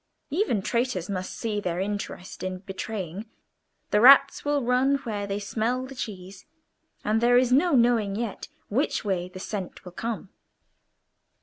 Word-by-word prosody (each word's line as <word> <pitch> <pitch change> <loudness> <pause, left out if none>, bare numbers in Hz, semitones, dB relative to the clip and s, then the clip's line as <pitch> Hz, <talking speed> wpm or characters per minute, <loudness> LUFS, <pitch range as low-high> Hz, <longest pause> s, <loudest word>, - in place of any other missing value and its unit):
Even 295 - +1
traitors 235 -7 -1
must 185 -1 -3
see 215 -3 -2
their 175 -2 -2
interest 195 -2 -4
in 185 0 -3
betraying; 195 0 -6 0.6
the 210 - +4
rats 275 +2 +7
will 290 -2 +1
run 250 +3 +3
where 205 -4 -3
they 200 0 -2
smell 225 +5 -1
the 270 - -9
cheese, 195 -6 -7 0.6
and 215 +2 +2
there 245 +1 +5
is 250 0 +3
no 325 +5 +4
knowing 235 -5 +3
yet 225 -1 -4 0.2
which 255 +1 0
way 180 -3 -1
the 185 0 -10
scent 190 -2 -6
will 180 - -8
come." 220 +1 -4
215 Hz, 150 wpm, -26 LUFS, 190-250 Hz, 0.6 s, rats